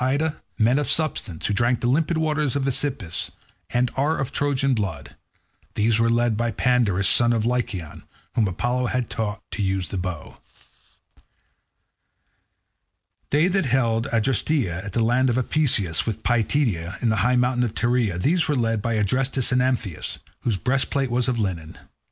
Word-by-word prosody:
Ida, 145 +4 0 0.2
men 120 +5 +3
of 145 - -1
substance, 125 - 0
who 105 - 0
drink 120 +3 +1
the - - -3
limpid 155 +5 +1
waters 150 -4 0
of 140 -1 0
the 135 - +1
Aesepus, 125 -11 -2 0.4
and 120 0 +1
are 145 +4 +1
of 135 - -3
Trojan 140 -1 +1
blood—these 110 +1 -4
were 115 0 +3
led 120 -1 +2
by 120 +2 0
Pandarus 110 -4 +1
son 120 0 +5
of 115 -2 0
Lycaon, 115 -9 -2 0.3
whom 110 -3 +2
Apollo 120 +7 -1
had 125 -2 -2
taught 105 -1 -3
to 105 - -3
use 95 -2 -1
the 95 - -3
bow. 90 -4 -6 2.9
They 150 +4 +3
that 190 -2 +1
held 115 -3 +1
Adresteia 115 - 0
and 100 - -5
the 115 +4 0
land 125 +3 +2
of 120 - 0
Apaesus, 120 - +1
with 110 0 -3
Pityeia, 110 - 0
and 120 -3 +1
the 110 - 0
high 120 +6 +2
mountain 125 0 +2
of 115 -2 -3
Tereia—these 120 - +1
were 150 - +1
led 115 -3 0
by 115 +1 -1
Adrestus 130 +5 +1
and 125 0 +3
Amphius, 125 -10 -2 0.2
whose 110 -5 -1
breastplate 135 +2 0
was 125 +1 +1
of 125 -2 0
linen. 90 -7 -3
120 Hz, 165 wpm, -23 LUFS, 105-130 Hz, 2.9 s, son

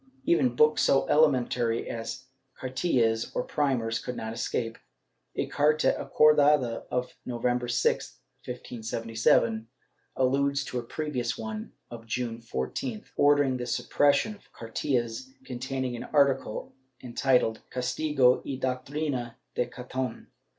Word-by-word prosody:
Even 125 -8 +3
books 150 +3 +4
so 135 - +3
elementary 125 -6 +2
as 115 +3 -5 0.3
cartillas, 125 -4 +1
or - - 0
primers, 125 -6 0
could 125 - -5
not 110 0 -4
escape. 115 0 -2 0.6
A - - 0
carta 150 +1 +2
acordada 145 -5 +4
of 125 0 -2
November 125 0 -1
6, 120 +1 0 0.3
1577, 115 -2 0 0.5
alludes 140 +2 +2
to 125 - -3
a - - -5
previous 125 -2 -3
one 110 -1 -6 0.2
of 115 -1 -9
June 120 0 -2
14th, 110 - -4
ordering 145 -2 +4
the 125 0 -4
suppression 145 - +2
of 205 - -19
cartillas 120 +1 -2 0.2
containing 130 0 -3
an 120 - -6
article 140 -6 +1 0.3
entitled 125 -2 +1
"Castigo 130 0 +2
y 135 - -4
doctrina 130 -1 -2 0.2
de 125 - 0
Caton." 125 0 -5
125 Hz, 115 wpm, -28 LUFS, 115-140 Hz, 0.6 s, books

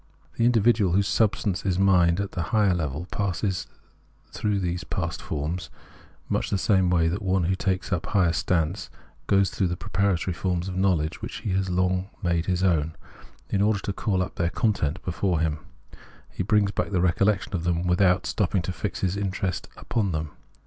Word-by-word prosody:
The 115 - +1
indi 120 -1 +4
vidual, 105 -5 +3
whose 100 0 +2
substance 105 -3 +1
is 95 -2 0
mind 90 -3 +4
at 100 -1 -2
the 85 - -3
higher 105 -4 +3
level, 80 -1 -2
passes 95 -1 -1 0.6
through 105 -2 -1
these 90 0 -2
past 85 -3 -3
forms, 80 +2 -3 0.6
much - - -1
in 100 - +2
the 95 -1 +3
way 80 -1 +3
that 90 +6 -2
one 95 -2 +1
who 90 +3 +1
takes 95 0 -1
up 85 - -2
a - - -7
higher 90 -5 +3
science 85 +2 0 0.4
goes 100 -1 +3
through 95 - 0
those 90 - -2
preparatory 95 -2 0
forms 90 0 -2
of 95 - -4
Imowledge, 90 -5 0
which - - -6
he 105 - -2
has 95 0 0
long 90 +1 0
made 85 -1 0
his 90 -1 0
own, 80 -4 +1 0.6
in 100 - +1
order 105 +1 +3
to 100 0 -4
call 95 -3 0
up - - -8
their 85 -2 +1
content 90 -6 0
before 90 -1 0
him; 80 -1 0 0.7
he - - -4
brings 100 0 +2
back - - -2
the 95 -3 0
recollection 95 +3 +1
of 85 - -2
them 85 0 0
without 90 +1 +3
stopping 95 -3 0
to 95 - -3
fix 95 +3 -4
his 95 0 0
interest 95 -2 -2
upon 100 -6 -1
them. 75 -1 -3
95 Hz, 190 wpm, -25 LUFS, 85-100 Hz, 0.7 s, indi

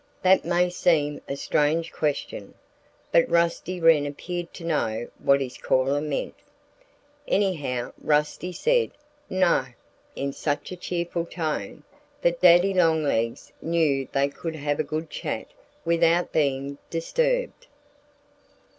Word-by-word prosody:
That 190 +1 +5
may 175 +1 +2
seem 150 -5 +1
a 140 - -2
strange 155 +4 0
question. 150 -2 -3 0.6
But 165 - +4
Rusty 170 +2 +1
Wren 165 -3 +5
appeared 175 +4 -5
to 170 - -9
know 120 -8 -1
what 140 0 +3
his 130 -2 -5
caller 135 +2 +1
meant. 150 -2 -3 0.9
Anyhow, 145 -11 0
Rusty 150 +4 0
said, 475 - +2 0.4
"No!" 180 -8 +2 0.5
in 140 0 -3
such 145 +4 -2
a - - -4
cheerful 175 -1 -3
tone 155 - -4 0.4
that 170 0 +1
Daddy 180 +2 +6
Longlegs 155 -10 +1
knew 155 -5 +1
they 140 0 +2
could 160 +3 -6
have 145 -1 -2
a - - +2
good 155 +1 -4
chat - - -4 0.4
without 170 +1 +3
being 140 -1 0
disturbed. - - -1
165 Hz, 120 wpm, -25 LUFS, 145-175 Hz, 0.9 s, Daddy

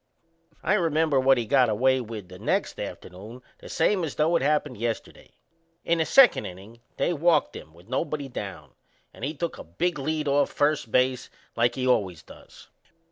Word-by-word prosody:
I - - +2
remember 160 -6 +2
what 135 0 +4
he 120 - -1
got 130 +1 +3
away 130 +4 +2
with 110 -5 -8
the 90 0 -12
next - - -1
afternoon 110 +8 -8 0.2
the - - -12
same 195 -4 +1
as 155 - -4
though 160 +3 +2
it - - +2
happened 150 -3 0
yesterday. 115 0 -5 0.6
In 170 0 +1
the 160 - +2
second 270 +5 +5
innin' 100 +6 -12 0.2
they 175 - +1
walked 165 -1 +2
him 80 - -10
with 85 +4 -19
nobody 140 +3 -2
down, 95 - -7 0.4
and - - -13
he 150 +4 -3
took 170 +3 -4
a - - -7
big 150 - -2
lead 155 +2 -2
off 140 0 +2
first 145 -6 0
base 125 0 +1 0.3
like 120 +1 +1
he 130 - -2
always 95 -10 0
does. - - -16
130 Hz, 185 wpm, -26 LUFS, 110-155 Hz, 0.6 s, second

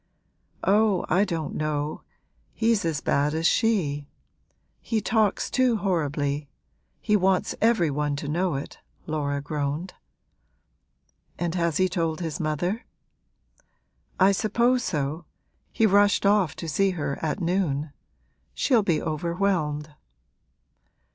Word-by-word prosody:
'Oh, 205 -1 +3
I 190 +3 +4
don't 165 -6 -3
know, 150 0 -2 0.5
he's 225 -4 +2
as 155 -3 -1
bad 145 +2 +1
as 160 +1 -1
she; 165 -11 +1 0.7
he 225 - -1
talks 215 -1 +1
too 255 -3 +2
horribly 145 -6 -1 0.5
he 210 - +1
wants 190 -2 +2
every 220 -9 +3
one 145 0 -1
to 145 +1 -5
know 170 +1 0
it,' 140 - -6 0.3
Laura 145 -2 -2
groaned. 150 +4 -3 1.4
'And 175 -1 -2
has 170 -3 0
he 185 - +3
told 165 -3 -1
his 165 0 -4
mother?' 175 - -1 1.4
'I 190 +1 +6
suppose 235 +5 +2
so: 155 - -2 0.5
he 225 - +2
rushed 205 0 +4
off 200 -5 +3
to 165 - -6
see 195 +6 +2
her 140 -2 -3
at 160 +4 -1
noon. 165 -5 -1 0.6
She'll 245 -5 +3
be 170 -6 +1
overwhelmed.' 160 -2 -1
170 Hz, 120 wpm, -25 LUFS, 150-200 Hz, 1.4 s, I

